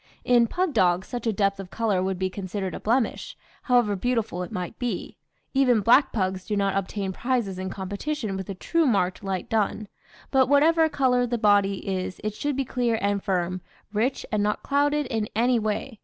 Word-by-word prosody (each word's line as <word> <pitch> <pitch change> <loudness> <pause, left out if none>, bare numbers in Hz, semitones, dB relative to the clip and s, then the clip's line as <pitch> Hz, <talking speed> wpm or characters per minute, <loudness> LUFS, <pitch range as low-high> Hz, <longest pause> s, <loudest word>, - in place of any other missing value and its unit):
In 240 -1 +4
pug 360 +4 -1
dogs 180 -2 +2
such 240 -2 -4
a - - +3
depth 200 -1 0
of 190 -2 -7
colour 210 -4 0
would 190 0 -1
be 190 +1 0
considered 190 -1 -4
a - - -5
blemish, 250 - -1 0.2
however 240 -5 +2
beautiful 225 -3 -1
it 180 - -6
might 180 +3 -5
be; 245 -1 -3 0.4
even 255 -5 +4
black 245 +7 +5
pugs 185 -3 -1
do 210 - -3
not 195 -1 +1
obtain 195 0 -2
prizes 235 -5 -1
in 190 0 -3
competition 200 +4 -4
with 190 0 -6
a 195 - -4
true 330 - +1
marked 190 -6 +1
light 190 -2 -3
dun; 215 -1 -1 0.4
but 265 -1 +4
whatever 320 +3 +4
colour 250 -4 +2
the 240 0 -1
body 200 -3 +2
is 185 -1 -3
it 215 -1 -2
should 290 +5 -2
be 270 0 -1
clear 240 -2 0
and 200 -1 0
firm, 185 -2 -1 0.3
rich 235 +6 0
and 210 -2 +1
not 210 +1 -1
clouded 290 +1 +1
in 220 -4 -2
any 240 +2 +3
way. 215 +2 -3
215 Hz, 195 wpm, -25 LUFS, 190-250 Hz, 0.4 s, black